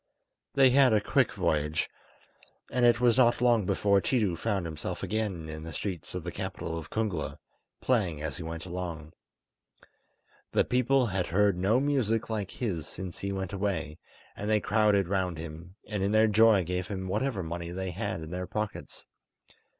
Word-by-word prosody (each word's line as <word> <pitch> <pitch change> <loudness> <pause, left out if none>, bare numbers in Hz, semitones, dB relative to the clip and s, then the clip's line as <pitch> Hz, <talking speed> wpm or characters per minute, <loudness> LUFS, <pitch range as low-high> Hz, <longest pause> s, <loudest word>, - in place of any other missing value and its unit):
They 135 -2 +6
had 130 -2 +5
a 105 - +5
quick 100 - +2
voyage, 75 +1 0 0.8
and 125 0 +2
it 120 0 +4
was 120 -1 +4
not 120 -2 +4
long 120 -5 +3
before 100 -1 +3
Tiidu 105 -3 +1
found 100 0 -1
himself 80 -2 -5
again 105 -7 -2
in 80 0 -6
the 80 +1 -7
streets 90 +1 -5
of - - -4
the - - -4
capital 80 - -4
of 80 -2 -6
Kungla, 105 -8 -2 0.4
playing 100 -12 +1
as 75 -4 -4
he - - -6
went 80 +1 -6
along. 85 -4 -5 1.4
The - - +3
people 125 +1 +3
had 95 -4 -1
heard 100 +2 +3
no 100 +7 +2
music 120 -6 0
like 105 -4 -2
his 90 - -3
since 90 +2 -7
he 100 - -3
went 95 -1 -4
away, 90 -6 -2 0.4
and 105 - -4
they 110 -1 +4
crowded 105 -2 +2
round 95 -3 -1
him, 80 +3 -8
and 105 -2 -3
in 100 +2 +1
their 110 0 +6
joy 110 -2 +5
gave 90 +1 -3
him 95 -2 -4
whatever 110 0 -1
money 85 +1 -5
they 95 +1 -4
had 95 -2 -3
in 80 0 -8
their 90 0 -4
pockets. 105 -1 -5
95 Hz, 175 wpm, -29 LUFS, 85-110 Hz, 1.4 s, They